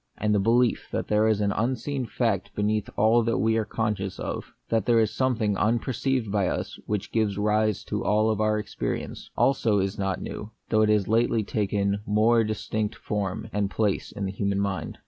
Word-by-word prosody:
And 105 0 +1
the 105 - +3
belief 115 +4 +2
that - - -3
there 105 +1 +3
is 110 -1 +2
an 100 -1 +1
unseen 130 +4 -1
fact 105 -4 -1
beneath 105 0 0
all 110 +3 +5
that 115 0 0
we 110 +3 +2
are 110 - 0
conscious 105 -4 -2
of - - -5
— - - -46
that 115 -3 +1
there 120 -1 +5
is 110 -1 +1
something 115 -5 +1
unperceived 120 +2 0
by 100 -3 +1
us - - -3
which 105 -2 -2
gives 110 -3 0
rise 105 -1 +1
to - - -3
all 110 +1 +2
our 110 0 +2
experience 105 - -4
— - - -48
also 115 -6 +3
is 95 +1 -1
not 95 -1 -1
new; 105 - -6 0.2
though 110 -1 +3
it 110 - +3
has 105 -3 +2
lately 115 0 +2
taken 100 -1 0
a 100 - -2
more 115 +2 +4
dis 110 -1 -4
tinct 110 -1 -1
form 105 0 -3
and 105 -1 0
place 105 -2 -1
in 100 - -4
the 95 - -2
human 100 0 -1
mind. 100 -1 -2
105 Hz, 205 wpm, -26 LUFS, 100-115 Hz, 0.2 s, all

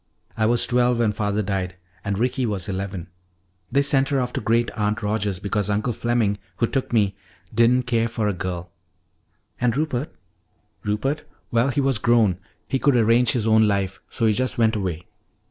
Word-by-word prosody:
I 110 -1 +2
was 120 +1 +3
twelve 125 0 +2
when 115 -2 +2
Father 105 0 -1
died, 95 -2 -2 0.3
and 100 -1 -2
Ricky 125 +2 0
was 100 -4 -2
eleven. 95 -3 -4 0.6
They 140 +1 +3
sent 140 -1 +2
her 140 -2 +1
off 125 -1 -2
to - - -2
Great 115 +2 +1
aunt 105 +1 -1
Rogers 105 -2 0
because 105 +1 -1
Uncle 105 +4 0
Fleming, 115 -3 0 0.2
who 115 - +2
took 130 +3 -2
me, 100 -4 +2 0.4
didn't 120 +3 +4
care 115 -2 +1
for 115 -2 -2
a 105 - +1
girl 90 -1 -5 0.5
" - - -36
"And 125 +1 +2
Rupert?" 145 -2 -1 0.7
"Rupert 135 +9 -1 0.3
well, 120 +2 +3
he 140 +2 0
was 135 -5 +1
grown, 110 -6 +3 0.3
he 135 - 0
could 140 -1 +3
arrange 115 +1 +4
his 120 -4 0
own 110 -1 +5
life; 100 -1 -1
so 115 - -1
he 110 - +4
just 130 +4 -1
went 115 -1 +3
away. 90 -5 -3
110 Hz, 185 wpm, -23 LUFS, 100-125 Hz, 0.7 s, own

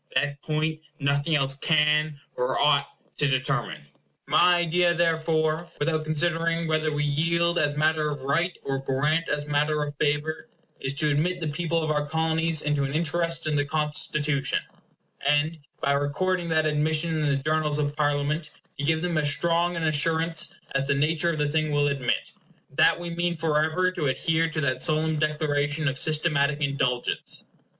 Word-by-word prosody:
That 145 -1 0
point 155 0 -1 0.2
nothing 140 +2 +1
else 135 -1 +2
can 150 0 +2 0.2
or 125 +1 0
ought 140 -1 +3 0.3
to 145 - +3
determine. 130 - -1 0.4
My 180 0 +5
idea, 175 0 +2
therefore, 160 -1 +1
without 155 +1 -1
considering 165 +1 0
whether 155 0 +1
we 150 0 -1
yield 170 +4 +1
as 145 0 0
matter 155 0 +2
of 145 -3 -5
right, 165 +6 0
or 135 0 -2
grant 150 +5 0
as 145 0 -1
matter 150 +1 +1
of 145 0 -5
favor, 150 +2 -1 0.3
is 135 +1 -1
to 150 +1 +2
admit 175 +5 0
the 160 - -3
people 165 +1 -1
of 155 - -1
our 150 -1 +1
Colonies 160 +1 0
into 150 -1 0
an 135 0 -3
interest 165 +1 0
in 155 -1 0
the 145 - +2
Constitution; 150 -1 -1 0.6
and, 150 +3 +1 0.2
by - - +2
recording 170 +6 0
that 160 -1 +2
admission 155 +2 +1
in 150 - 0
the 140 - +2
journals 150 +1 0
of 145 -1 -1
Parliament, 150 +1 0 0.3
to - - -2
give 160 +2 +1
them 170 -3 0
as 145 -1 +1
strong 170 +3 +1
an 165 - -3
assurance 160 +2 0 0.2
as 135 0 0
the 140 - +2
nature 155 +4 +1
of 165 - -1
the 150 -1 +1
thing 155 +1 0
will 145 0 +2
admit, 135 -3 -1 0.4
that - - +4
we 175 0 -5
mean 175 +1 -1
forever 160 +3 +1
to 170 -5 -2
adhere 160 +5 +1
to 155 -1 -3
that 130 -2 -1
solemn 155 -1 +1
declaration 150 0 0
of 135 - 0
systematic 150 -2 +1
indulgence. 140 -4 -1
155 Hz, 170 wpm, -26 LUFS, 145-165 Hz, 0.6 s, My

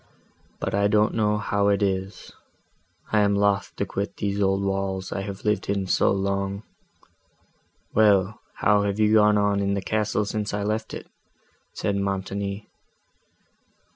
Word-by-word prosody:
But - - -3
I 100 +1 +3
don't 105 +1 +3
know 105 -1 +1
how 100 -1 0
it 100 0 +2
is—I 95 +2 -5
am 100 -1 +3
loth 100 0 +1
to 100 - -1
quit 100 +1 -4
these 100 0 -2
old 95 0 +2
walls 95 -1 -2
I 100 - -2
have 100 0 -7
lived 105 -1 0
in 100 -1 0
so 95 - +2
long." 100 +1 -1 1.3
"Well, 105 -1 +3
how 105 0 +3
have 100 0 -1
you 110 0 +3
gone 105 -1 +5
on 100 -1 +2
in 100 0 0
the - - -1
castle, 105 +1 0
since 105 0 -3
I 105 - -2
left 110 +2 -2
it?" - - -8 0.7
said 100 - -1
Montoni. 100 +1 -3
100 Hz, 150 wpm, -24 LUFS, 100-105 Hz, 1.3 s, gone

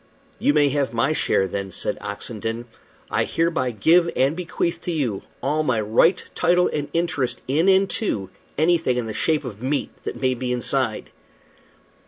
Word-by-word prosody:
"You 145 - +2
may 145 -1 +4
have 140 -3 -1
my 135 +7 +2
share, 95 -9 +1
then," 100 +1 -4
said - - -2
Oxenden. 115 +1 -5 0.5
"I - - +2
hereby 165 -6 0
give 165 - +4
and 135 +4 +2
bequeath 170 -1 -2
to 175 - -3
you 130 - -1 0.2
all 150 +3 +1
my 130 -7 +1
right, 115 - +3
title, 180 +1 +3
and 145 -1 -2
interest 165 -6 -1
in 155 +8 +3
and 190 +1 +5
to 100 - -1 0.3
anything 160 -5 +2
in 120 - -1
the 110 - -4
shape 155 +4 0
of 110 -3 -7
meat 140 +3 -1
that - - -5
may 130 -1 +2
be 125 0 -3
inside." 125 -2 0
140 Hz, 170 wpm, -23 LUFS, 120-165 Hz, 0.5 s, and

